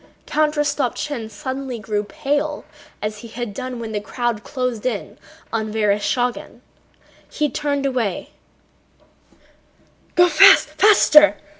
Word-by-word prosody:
Count 305 0 0
Rostopchín 290 -4 -2
suddenly 260 +4 -5
grew 210 -1 -3
pale 290 +7 -3 0.4
as 210 0 -4
he 235 - -10
had 230 -1 -6
done 255 +2 -6
when 225 -1 -6
the 210 -1 -3
crowd 235 0 -3
closed 250 -5 -3
in 240 -5 -4 0.3
on 220 -1 -2
Vereshchágin. 220 +3 -1 0.7
He 300 -1 -1
turned 285 -2 -2
away. 245 -8 -2
245 Hz, 100 wpm, -20 LUFS, 215-275 Hz, 0.7 s, Count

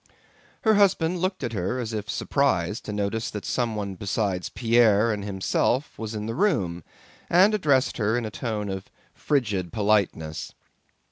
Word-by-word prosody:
Her 220 - +5
husband 185 -4 +3
looked 185 +1 -2
at 115 - -3
her 100 +5 -1
as 115 -3 -4
if 105 -1 -4
surprised 105 -4 0
to - - -4
notice 105 +2 -2
that 105 - -6
someone 110 -5 -1
besides 95 -1 -2
Pierre 115 -2 +3
and 105 -1 -4
himself 100 +7 -1
was 110 0 -4
in 105 0 -4
the 115 - -3
room, 100 - 0 0.5
and 190 +5 +5
addressed 145 -10 +2
her 110 +1 +1
in 120 - -2
a 110 - -5
tone 105 -2 -3
of 95 -1 -5 0.2
frigid 105 - -1
politeness. 100 -7 0
110 Hz, 155 wpm, -25 LUFS, 100-130 Hz, 0.5 s, Her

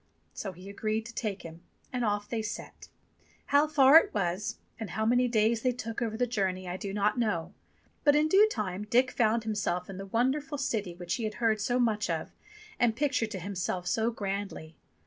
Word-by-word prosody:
So 195 - -5
he 185 +2 -12
agreed 215 +2 -2
to 235 - -9
take 210 -4 -3
him, 165 0 -10 0.3
and 250 -1 -1
off 205 -1 0
they 230 -2 -2
set. 215 0 -7 0.6
How 285 +2 +4
far 285 -1 +7
it 330 - +4
was 190 0 -1 0.2
and 220 -4 -5
how 220 +5 -1
many 245 +2 +3
days 225 0 +2
they 255 - +2
took 230 -2 -5
over 220 -2 -2
the 245 - +2
journey 190 -6 -1
I 180 - -3
do 195 +1 -5
not 210 +4 +1
know, 180 -6 -1 0.5
but 290 -1 +5
in 300 +1 +4
due 400 +6 +6
time 205 - -3
Dick 250 +4 +3
found 230 -1 +2
himself 200 -4 -2
in 190 - -8
the 195 - -6
wonderful 275 +8 0
city 210 -9 -2
which 175 0 -4
he 235 - -4
had 215 0 -3
heard 220 -3 +1
so 245 +4 +1
much 215 -5 +1
of 165 -2 -2 0.5
and 235 -2 +3
pictured 265 -5 0
to 195 - -5
himself 180 -1 -3
so 220 +5 +1
grandly. 195 -7 -5
215 Hz, 205 wpm, -29 LUFS, 195-245 Hz, 0.6 s, far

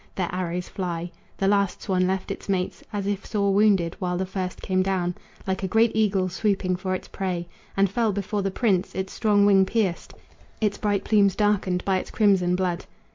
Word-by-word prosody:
Their 180 -3 -2
arrows 180 -1 -2
fly. 175 -2 -4 0.3
The 195 - +1
last 200 -1 +1
swan 185 -2 +1
left 190 0 -2
its - - -7
mates 185 -2 -1
As 205 -2 -3
if 200 0 -2
sore 200 -2 0
wounded, 195 -5 +3
while 180 -1 -1
the 190 - -1
first 185 -1 -4
came 185 -1 0
down 185 -2 0 0.3
Like 190 0 -1
a 190 - -1
great 225 +4 +3
eagle 200 -4 +2
swooping 185 -1 0
for 185 0 -2
its - - -7
prey, 180 -3 -3 0.3
And 195 0 +5
fell 220 +3 +1
before 200 +1 -2
the 195 - 0
prince, 195 -2 0
its 190 0 -3
strong 205 -3 +3
wing 195 -1 +6
pierced, 190 -3 -1 0.4
Its 210 -2 0
bright 205 -2 0
plumes 200 -3 +3
darkened 200 -3 +1
by 190 -1 +2
its - - -8
crimson 190 -5 +3
blood. 180 -1 -1
190 Hz, 195 wpm, -25 LUFS, 185-205 Hz, 0.4 s, wing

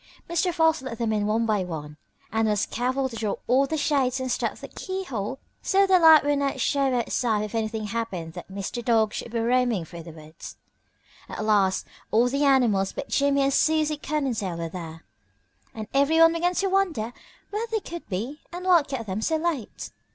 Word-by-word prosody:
Mr. 340 +2 +1
Fox 320 -3 +2
let 260 -3 -6
them 225 -1 0
in 210 -1 0
one 225 +2 +1
by 210 -4 +1
one 150 -4 -6 0.4
and 220 0 +1
was 210 -1 +1
careful 260 +2 -1
to 240 - -9
draw 215 -3 -2
all 270 +2 +3
the 315 - -2
shades 270 -4 +1
and 260 -1 -2
stuff - - -2
the - - -8
keyhole 270 - -4 0.2
so 395 0 +3
the 380 -1 +5
light 320 -2 +8
would 290 -1 +2
not 280 -1 -1
show 275 -2 +1
outside 230 -2 0
if 215 - -6
anything 220 -1 -2
happened 200 -7 -4
that 175 +2 -9
Mr. 200 +5 -5
Dog 225 -2 +2
should 235 - -6
be 235 - -2
roaming 235 -5 +1
through 170 +1 -10
the 165 - -11
woods. 155 0 -11 0.7
At 215 - -4
last 200 -3 +2 0.2
all 235 +3 +3
the 280 +3 0
animals 240 -9 +3
but - - -6
Jimmie 280 0 +2
and 275 0 +1
Susie 310 0 +2
Cottontail 260 - -2
were 165 -1 -4
there, 165 -2 -8 0.7
and 215 -1 -7
everyone 320 +4 +5
began 350 +2 0
to 390 - +1
wonder 350 - 0 0.4
where 430 +3 -2
they 450 -1 -1
could 345 -4 -9
be 230 +10 -4
and 355 +1 -7
what 345 -5 +4
kept 260 -5 -4
them 200 +1 -3
so 320 +8 +1
late. 315 -8 -3
245 Hz, 195 wpm, -25 LUFS, 210-305 Hz, 0.7 s, light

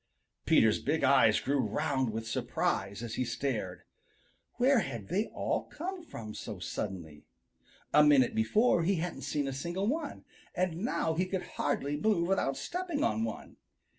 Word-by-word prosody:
Peter's - - +5
big - - -1
eyes - - +5
grew 140 +1 0
round 130 +1 0
with 110 +1 -4
surprise 100 -1 -1
as 115 -2 -5
he 130 - 0
stared. 115 -7 -3 0.7
Where 255 +1 +4
had 115 - -5
they 205 +5 0
all - - -2
come 365 +4 -6
from 110 - -8
so - - -6
suddenly? 80 -7 -6 0.7
A 150 - +7
minute 140 -4 +5
before 175 - +3
he 190 +4 +2
hadn't 175 0 -3
seen 145 -2 -1
a 135 - -2
single 170 +8 -3
one, 305 +9 -3 0.3
and 180 -2 0
now 165 -8 0
he 180 +3 0
could 185 -1 -2
hardly 145 0 -2
move 175 -2 +2
without 180 -8 +1
stepping 350 -4 -3
on 110 +1 +1
one. 115 - -6
145 Hz, 160 wpm, -31 LUFS, -, 0.7 s, A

